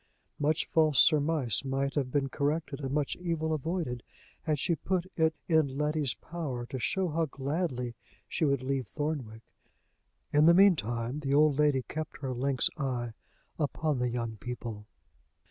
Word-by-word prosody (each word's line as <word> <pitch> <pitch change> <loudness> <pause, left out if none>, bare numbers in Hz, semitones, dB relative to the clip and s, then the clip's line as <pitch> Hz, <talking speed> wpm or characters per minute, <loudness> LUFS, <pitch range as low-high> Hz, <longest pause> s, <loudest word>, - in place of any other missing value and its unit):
Much 155 +6 +1
false 155 -5 +3
surmise 150 -6 +3
might 135 0 -1
have 135 -3 0
been 140 0 +1
corrected, 145 +1 -1
and 135 -2 -3
much 145 0 0
evil 165 -3 -1
avoided, 155 -5 -2 0.4
had 155 -2 0
she 170 - +1
put 180 +3 -1
it 160 -1 +2
in 155 -5 +2
Letty's 150 -2 0
power 140 -8 -5
to 130 +2 -5
show 190 +7 0
how 165 +1 +1
gladly 135 -3 -2 0.3
she - - -2
would 140 -3 +2
leave 135 -1 -1
Thornwick. 140 -8 -4 0.9
In 150 +2 +6
the 170 - +8
mean 195 0 +7
time 120 +2 -3
the 140 -1 0
old 150 -1 +4
lady 145 -3 +3
kept 155 +3 -5
her 130 -2 -2
lynx 130 0 +1
eye 125 -5 -2 0.5
upon 150 -1 0
the 125 0 +1
young 115 -2 -3
people. 115 -2 -6
145 Hz, 160 wpm, -30 LUFS, 130-155 Hz, 0.9 s, the